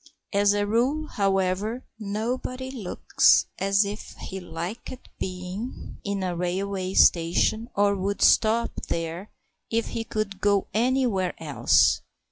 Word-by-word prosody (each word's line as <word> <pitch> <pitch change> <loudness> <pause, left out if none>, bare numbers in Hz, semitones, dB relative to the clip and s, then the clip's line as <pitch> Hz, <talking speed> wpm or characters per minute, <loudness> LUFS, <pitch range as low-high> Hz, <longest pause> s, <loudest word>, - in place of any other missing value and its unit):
As 200 0 +4
a 205 0 +1
rule, 250 +9 +1
however, 195 +4 0
nobody 245 +5 -3
looks 225 -9 +3
as 195 +1 +3
if 205 +2 -7
he 190 - -6
liked 180 +9 -7
being 185 +5 -6
in 200 -1 -2
a 180 -1 -2
railway 185 +2 -2
station 180 +7 +3
or 200 0 +3
would 200 +1 -1
stop 230 +1 +4 0.2
there 165 +4 -3 0.4
if 230 0 -1
he 230 - -3
could 215 -3 -4
go 200 -1 +3
anywhere 230 -5 +1
else. 150 -3 +3
200 Hz, 120 wpm, -25 LUFS, 185-225 Hz, 0.4 s, As